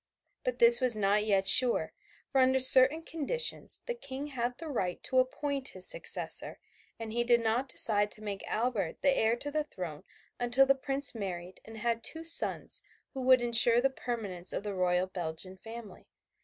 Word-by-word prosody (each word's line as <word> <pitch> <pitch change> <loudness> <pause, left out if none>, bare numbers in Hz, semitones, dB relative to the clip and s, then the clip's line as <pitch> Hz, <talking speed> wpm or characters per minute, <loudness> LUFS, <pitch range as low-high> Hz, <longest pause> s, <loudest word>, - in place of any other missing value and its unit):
But - - -4
this 470 0 +5
was 250 -3 +3
not 210 0 -1
yet 195 -2 -1
sure, 245 +4 +5 0.3
for 270 - -1
under 260 0 +1
certain 265 +4 +8
conditions 330 - 0
the 485 - -5
King 280 - -8
had 245 -4 -6
the 330 - -10
right 185 -11 -5
to 260 - -1
appoint 275 +1 -3
his - - +5
successor, - - 0 0.4
and 225 -1 -9
he 240 +1 -1
did 240 0 +1
not 235 +4 -3
decide 205 -4 +3
to 215 - -16
make 200 -2 -7
Albert 220 -7 -4
the 275 -1 +1
heir 225 -1 0
to 290 +4 -8
the 305 +1 -3
throne 175 - -10 0.4
until 245 +2 +1
the 275 - +2
Prince 275 0 -3
married 185 -4 -9
and 225 0 -13
had 230 +1 -4
two 325 0 -5
sons 330 0 -2 0.3
who 265 - -7
would 255 -1 +2
ensure 235 0 +4
the 270 +2 -1
permanence 205 -9 -5
of - - -6
the 205 -1 -6
royal 180 -1 -2
Belgian 185 0 -7
family. 225 0 -13
240 Hz, 185 wpm, -28 LUFS, 205-270 Hz, 0.4 s, certain